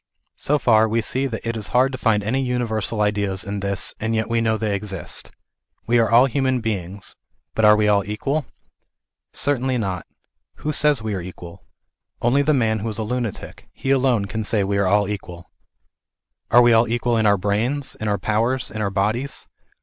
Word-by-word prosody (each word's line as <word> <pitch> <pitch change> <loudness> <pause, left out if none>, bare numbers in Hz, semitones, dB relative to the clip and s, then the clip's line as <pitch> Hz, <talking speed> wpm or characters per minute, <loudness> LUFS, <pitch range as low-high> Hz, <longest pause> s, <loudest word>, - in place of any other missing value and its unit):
So 150 - +2
far 110 -5 +4
we 115 +2 +1
see 130 +5 -1
that 115 -2 -6
it 115 - -1
is 110 -2 -3
hard 130 +1 +4
to 130 - -5
find 105 -2 +2
any 125 +6 0
universal 115 -4 -1
ideas 100 -2 0
in 100 -1 -4
this, 100 0 0
and 110 +1 -1
yet 110 +1 -1
we 115 0 +2
know 110 -1 +1
they 105 -1 -1
exist. 100 -2 -4 0.6
We 120 0 +3
are 115 -2 +2
all 120 +3 +6
human 130 -1 0
beings, 100 -4 -4 0.4
but 110 - +2
are 105 0 +8
we 105 0 +2
all 100 -1 +3
equal? 135 - -2 0.8
Certainly 130 -2 +1
not. 95 -6 -3 0.5
Who 150 - -3
says 150 -4 +2
we 110 -1 -2
are 95 - -3
equal? 90 0 -11 0.5
Only 125 +4 +2
the 150 +2 +2
man 110 -6 +1
who 110 +3 -3
is 110 - -4
a 110 - -2
lunatic; 120 -2 -5
he 135 - -3
alone 130 -6 +2
can 110 +3 -4
say<Ave 100 -2 0
are 100 -1 +2
all 100 +1 +3
equal. 90 -5 -7 1.0
Are 120 +1 +6
we 120 -1 +5
all 115 +1 +4
equal 120 +1 0
in 110 -1 +2
our 100 -1 +4
brains, 110 +9 -1
in 110 - -5
our 105 -1 +1
powers, 115 +5 0
in 110 - -4
our 100 - 0
bodies 110 +8 -2
110 Hz, 195 wpm, -22 LUFS, 100-125 Hz, 1.0 s, are